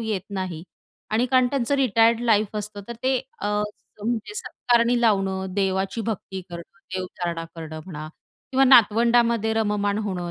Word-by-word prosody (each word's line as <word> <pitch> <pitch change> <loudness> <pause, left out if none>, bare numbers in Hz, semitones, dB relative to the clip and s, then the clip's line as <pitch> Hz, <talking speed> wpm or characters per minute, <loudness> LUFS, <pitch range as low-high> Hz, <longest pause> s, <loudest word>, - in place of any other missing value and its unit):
येत 215 -5 -2 0.2
नाही 180 -4 -4 0.5
आणि 225 +3 +2
कारण 255 0 +4
त्यांचं 275 0 0
रिटायर्ड 230 -3 +3
लाईफ 215 -3 +2
असतं 210 0 -5
तर 235 - -5
ते 260 0 +2 0.2
अ, - - -2 0.6
म्हणजे 235 - -2
सत्कारणी 240 - +1
लावणं, 190 -4 +1
देवाची 195 +2 0
भक्ती 195 -3 -4
करणं, 170 +3 -10 0.2
देवधारणा 175 -2 -4
करणं 160 -1 -7
म्हणा 155 -4 -7 0.4
किंवा 265 +1 +5
नातवंडामध्ये 235 -2 +5
रममाण 205 -2 0
होणं 185 -5 -3
210 Hz, 140 wpm, -24 LUFS, 190-235 Hz, 0.6 s, किंवा